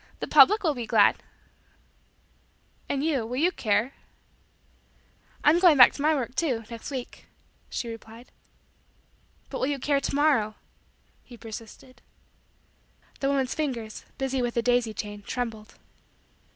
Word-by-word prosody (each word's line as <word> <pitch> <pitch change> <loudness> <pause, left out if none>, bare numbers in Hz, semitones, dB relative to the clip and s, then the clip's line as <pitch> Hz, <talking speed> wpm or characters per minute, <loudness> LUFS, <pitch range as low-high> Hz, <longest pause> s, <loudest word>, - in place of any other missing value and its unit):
"The - - -3
public 305 +10 +6
will 315 -4 +2
be 240 -4 -6
glad." 215 -3 +4 1.7
"And 280 0 -1
you, 295 -6 0
will 235 +3 -5
you 340 +6 +2
care?" 215 - 0 1.5
"I'm 315 +4 +5
going 350 -5 +6
back 250 - +8
to - - -7
my 310 +1 +3
work, 250 -3 -3
too, 260 -7 -1
next 230 -1 -7
week," 260 -3 -7 0.4
she 240 - -4
replied. 225 +1 -11 1.2
"But - - -4
will 260 - 0
you 285 -1 -1
care 280 +1 0
to - - -3
morrow?" 275 -8 +2 0.7
he 245 - -14
persisted. 230 +3 -11 1.2
The 275 - 0
woman's 270 -2 0
fingers, 240 -8 -4
busy 265 -1 -1
with 240 -1 -2
the 235 - 0
daisy 245 -3 +1
chain, 205 -1 -6
trembled. 225 -1 -5
250 Hz, 140 wpm, -26 LUFS, 225-280 Hz, 1.7 s, back